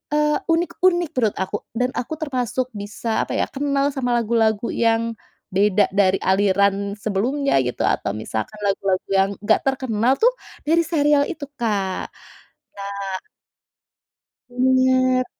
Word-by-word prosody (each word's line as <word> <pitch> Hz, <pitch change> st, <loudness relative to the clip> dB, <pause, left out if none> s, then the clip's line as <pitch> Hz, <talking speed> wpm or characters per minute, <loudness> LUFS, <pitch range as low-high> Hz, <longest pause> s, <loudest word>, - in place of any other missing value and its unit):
eee, 300 Hz, 0 st, +2 dB
unik-unik 345 Hz, 0 st, +2 dB
menurut 225 Hz, -5 st, +1 dB
aku 195 Hz, -, -5 dB, 0.2 s
dan 250 Hz, +2 st, 0 dB
aku 250 Hz, +6 st, -4 dB
termasuk 255 Hz, -3 st, -1 dB
bisa 210 Hz, +2 st, -3 dB
apa -, -, -3 dB
ya -, -, +2 dB
kenal 280 Hz, 0 st, 0 dB
sama 245 Hz, -3 st, -1 dB
lagu-lagu 225 Hz, -1 st, +1 dB
yang 230 Hz, 0 st, +2 dB, 0.5 s
beda 205 Hz, +1 st, +3 dB
dari 195 Hz, -1 st, +3 dB
aliran 200 Hz, +1 st, +2 dB
sebelumnya 230 Hz, +8 st, -1 dB
gitu 125 Hz, -, -3 dB
atau -, -, 0 dB
misalkan 110 Hz, -, -4 dB
lagu-lagu 195 Hz, -1 st, 0 dB
yang 195 Hz, 0 st, +3 dB
enggak 220 Hz, -, +4 dB
terkenal 255 Hz, -2 st, +1 dB
tuh 485 Hz, +2 st, +4 dB, 0.3 s
dari 330 Hz, +2 st, +3 dB
serial 295 Hz, -3 st, +2 dB
itu 305 Hz, -4 st, -5 dB
Kak. 200 Hz, -5 st, -1 dB, 0.7 s
Nah 200 Hz, -1 st, -5 dB, 1.3 s
bener. 255 Hz, 0 st, +3 dB
235 Hz, 125 wpm, -21 LUFS, 200-275 Hz, 1.3 s, enggak